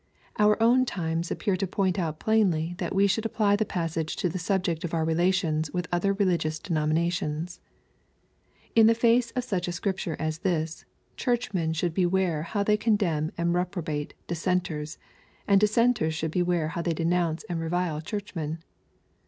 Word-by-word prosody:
Our 210 +1 +4
own 250 +3 +5
times 165 -5 -2
appear 200 -4 0
to 190 +1 -2
point 190 0 0
out 160 -3 -2
plainly 180 -7 +2
that - - -3
we 195 +1 +5
should 200 +3 +1
apply 215 -2 +2
the 215 +1 0
passage 165 -4 -2
to 180 - 0
the 185 - -4
subject 175 -1 -1
of 170 -1 -2
our 160 -1 +1
relations 165 -2 +1
with 180 0 -3
other 175 +3 +2
religious 175 -6 +1
denominations. 160 0 -1 1.1
In 225 -1 +7
the 230 - +5
face 235 +1 +3
of 250 - 0
such 185 -7 -2
a - - -1
Scripture 185 -2 -2
as 155 0 -3
this, 165 -4 -2 0.3
Churchmen 220 -10 0
should 165 +1 -1
beware 180 -3 +1
how 200 +5 -1
they 210 +1 +3
condemn 195 -8 +1
and 170 0 +1
reprobate 175 -5 -2
Dissenters, 165 -3 -2 0.5
and 200 -1 +5
Dissenters 215 -5 +2
should 160 0 -2
beware 175 -2 +1
how 170 - -3
they 170 0 0
denounce 165 0 0
and 175 -6 -4
revile 165 -1 -1
Churchmen. 165 -4 -4
175 Hz, 160 wpm, -27 LUFS, 160-200 Hz, 1.1 s, In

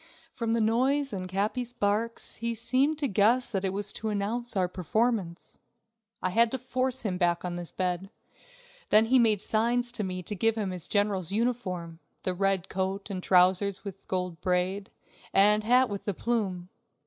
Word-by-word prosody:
From 230 -1 -1
the 230 - +2
noise 260 +5 +1
and 185 -2 -4
Capi's 215 +6 -1
barks, 225 +1 -1
he 235 0 -2
seemed 265 +7 +1
to 290 -2 0
guess 225 +4 +2
that 195 -3 -1
it 190 - 0
was 200 +1 0
to 220 - -4
announce 215 +3 -2
our 185 -1 +2
performance. 185 0 -1 0.6
I 185 - +1
had 230 +4 +4
to 265 - -2
force 255 0 -1
him 185 -5 -2
back 175 -1 +1
on 175 -1 -3
his 175 -1 -6
bed; 185 +1 -2 0.8
then 215 +1 +6
he 255 +3 +4
made 215 -4 +3
signs 240 +3 +1
to 240 -3 -4
me 185 -1 -4
to 210 - -2
give 225 +3 +2
him 205 -4 -2
his 180 -3 -5
general's 205 -4 0
uniform 195 -8 -2 0.2
the 185 - 0
red 195 0 0
coat 195 +2 -3
and 185 -2 -4
trousers 185 +2 +3
with 195 -2 -9
gold 180 -3 -3
braid, 185 +2 0 0.5
and 210 +2 +5
hat 250 +3 +4
with 200 -2 -6
the 205 - -2
plume. 190 -7 -2
205 Hz, 180 wpm, -28 LUFS, 185-235 Hz, 0.8 s, then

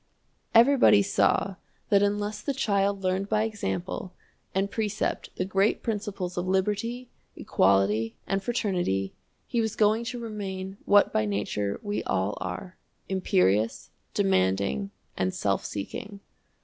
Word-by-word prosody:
Everybody 235 -4 +6
saw 195 -1 +1 0.3
that 200 -1 +5
unless 205 +1 0
the 280 - -2
child 200 -5 +1
learned 185 +2 0
by 215 0 +2
example 190 -4 -3 0.4
and 195 +1 0
precept 215 -2 -2
the 185 - -1
great 195 +2 +1
principles 200 -5 -3
of 175 +1 -1
liberty, 210 +6 -1 0.3
equality, 105 +4 +2
and 195 0 -1
fraternity, 180 - -1 0.3
he 235 - 0
was 220 -2 -2
going 215 +2 +3
to 245 +1 -4
remain 195 -4 -5
what 205 0 +5
by 110 - +2
nature 100 0 -2
we 205 0 -2
all 95 +2 0
are, 185 -1 -5 0.3
imperious, 110 - +1 0.2
demanding, 95 -8 +1 0.3
and 95 0 0
self 100 -2 0
seeking. 200 - -6
195 Hz, 125 wpm, -27 LUFS, -, 0.4 s, Everybody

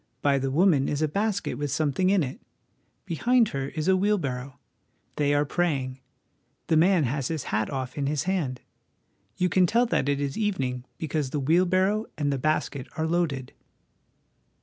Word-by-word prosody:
By 140 -1 +3
the 135 0 -1
woman 150 -2 +3
is 150 +1 -1
a - - +3
basket 200 +4 -1
with 145 0 -2
something 155 +6 +1
in 195 -4 +3
it; 130 - -6 0.6
behind 235 +7 +2
her 135 0 -3
is 155 +2 -4
a 190 - +5
wheelbarrow. 140 -10 -1 0.6
They 145 -1 +2
are 145 +1 +2
praying; 135 -5 -1 0.7
the 160 - +1
man 175 +1 +4
has 135 +1 -1
his 160 -3 -3
hat 105 +1 +1
off 130 -2 -4
in 140 - 0
his 150 0 0
hand. 165 -10 -1 0.8
You 180 - +2
can 180 0 +3
tell 235 +5 +3
that 145 - 0
it 140 0 +1
is 140 +3 -2
evening, 130 - -1
because 155 -3 -2
the 145 - -2
wheel 165 +7 +3
barrow 190 +4 +1
and 145 -2 0
the 135 - -2
basket 145 -2 -1
are 160 - 0
loaded." 160 -6 -1
150 Hz, 175 wpm, -26 LUFS, 135-185 Hz, 0.8 s, a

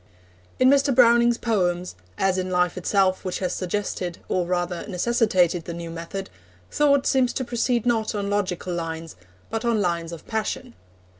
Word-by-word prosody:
In 255 - +4
Mr. 275 -1 +4
Browning's 235 -1 +5
poems, 180 -6 0 0.2
as 190 -1 +1
in 185 0 -2
life 180 -1 +1
itself 190 +1 +1
which 185 -2 -3
has 185 - -2
suggested, 185 -2 -3
or 180 -2 0
rather 175 -1 -1
necessitated, 185 -4 +1
the 170 - -5
new 170 -1 -6
method, 170 +4 -6 0.4
thought 280 -2 +3
seems 255 -2 +3
to 260 - -2
proceed 240 0 0
not 225 -2 +1
on 200 -1 -2
logical 185 -3 -1
lines, 165 -1 -5 0.4
but 225 0 -2
on 235 -2 +1
lines 170 -3 -1
of 165 -2 -9
passion. 235 +3 -3
195 Hz, 160 wpm, -24 LUFS, 175-235 Hz, 0.4 s, Browning's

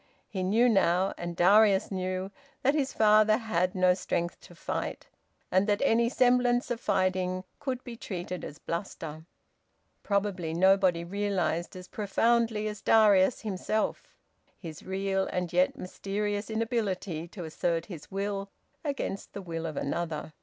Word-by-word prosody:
He 190 -4 -4
knew 215 +7 +3
now, 190 -4 +3
and 175 0 -5
Darius 195 +3 +5
knew, 185 0 -3 0.3
that 275 +2 +4
his 285 -3 0
father 215 0 +5
had 185 -6 -1
no 185 -1 +4
strength 175 -1 -2
to - - -15
fight, - - -4 0.4
and 190 +2 +3
that 205 0 +2
any 235 -2 +3
semblance 245 -1 +3
of 235 - -1
fighting 185 0 0 0.2
could 260 -3 -3
be 240 -2 -7
treated 180 -5 -5
as 150 - -7
bluster. 160 -3 -5 0.8
Probably 195 -5 -1
nobody 185 -1 +4
realised 185 -3 -1
as 180 0 -9
profoundly 225 +1 +1
as 210 -1 -5
Darius 210 -1 +5
himself, 215 +1 -2 0.4
his 160 -5 -9
real 195 0 -1
and 180 -1 -3
yet 180 +1 +2
mysterious 205 +3 -3
inability 205 -7 -2
to 180 +1 -8
assert 165 +1 -1
his 170 -7 -10
will 195 0 -3 0.3
against 280 -9 -4
the 200 - -6
will 165 -2 -4
of 155 - -6
another. 160 0 -3
195 Hz, 140 wpm, -29 LUFS, 180-215 Hz, 0.8 s, Darius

